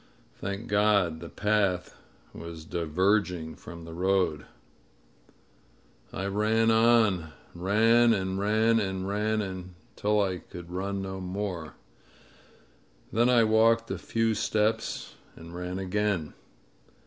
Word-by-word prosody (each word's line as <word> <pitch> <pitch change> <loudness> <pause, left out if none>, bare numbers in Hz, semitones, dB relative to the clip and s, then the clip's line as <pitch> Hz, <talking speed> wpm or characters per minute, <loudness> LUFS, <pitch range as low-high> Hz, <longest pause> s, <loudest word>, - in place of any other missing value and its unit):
Thank 100 +3 -5
God 100 -6 +2
the 85 0 -8
path 100 -4 0 0.4
was 85 -1 -9
diverging 90 0 0
from 85 -1 -11
the 80 - -9
road! 90 -3 0 1.6
I 95 - -4
ran 110 +3 +2
on 110 -8 +3
— - - -28
ran 115 +6 +4
and 95 -3 -1
ran 110 +3 +3
and 95 -2 -2
ran, 105 +2 0
until 95 +2 -3
I 95 -3 0
could 85 0 -11
run 95 +2 -3
no 95 0 -5
more. 90 -4 -4 1.4
Then 120 +3 +3
I 120 -2 +5
walked 115 +1 +3
a - - -3
few 115 -1 0
steps 110 +1 -1 0.2
and 85 +1 -11
ran 90 +1 -5
again. 95 -3 -1
100 Hz, 115 wpm, -28 LUFS, 90-110 Hz, 1.6 s, I